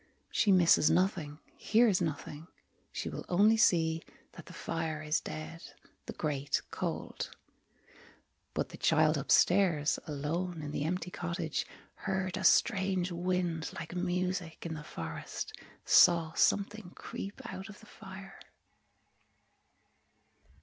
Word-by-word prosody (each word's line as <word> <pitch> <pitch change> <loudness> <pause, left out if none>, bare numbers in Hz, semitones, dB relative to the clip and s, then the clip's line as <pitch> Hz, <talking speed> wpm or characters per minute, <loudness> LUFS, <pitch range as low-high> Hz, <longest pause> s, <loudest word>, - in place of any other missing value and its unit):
She 205 - +3
misses 170 -4 +5
nothing, 175 -6 +1 0.2
Hears 220 -4 +3
nothing. 155 0 -4 0.4
She - - -4
will - - -5
only 205 +5 +5
see 165 -6 +3 0.3
That - - -12
the - - -10
fire 160 -1 -3
is 155 +1 +1
dead, 160 +2 -7 0.5
The - - -5
grate 145 -2 -1
cold. - - -4 1.3
But - - -1
the - - -10
child 155 0 +4
upstairs, 160 +2 +3
Alone, 160 +3 -3
in 145 - -5
the 145 - -2
empty 180 +1 -2
cottage, 170 -2 -3 0.3
Heard 190 -2 -2
a 190 - -4
strange 190 -3 +3
wind, 175 -2 -1
like 165 +1 -7
music, 180 -2 -2
In 165 - -3
the 150 -1 -7
forest, 80 - -6 0.3
Saw 165 -2 +6
something 200 -2 +1
creep 200 +5 -7
out 190 -1 -7
of 210 - -11
the 220 - -16
fire. 195 -1 -11
175 Hz, 120 wpm, -31 LUFS, 155-190 Hz, 1.3 s, Saw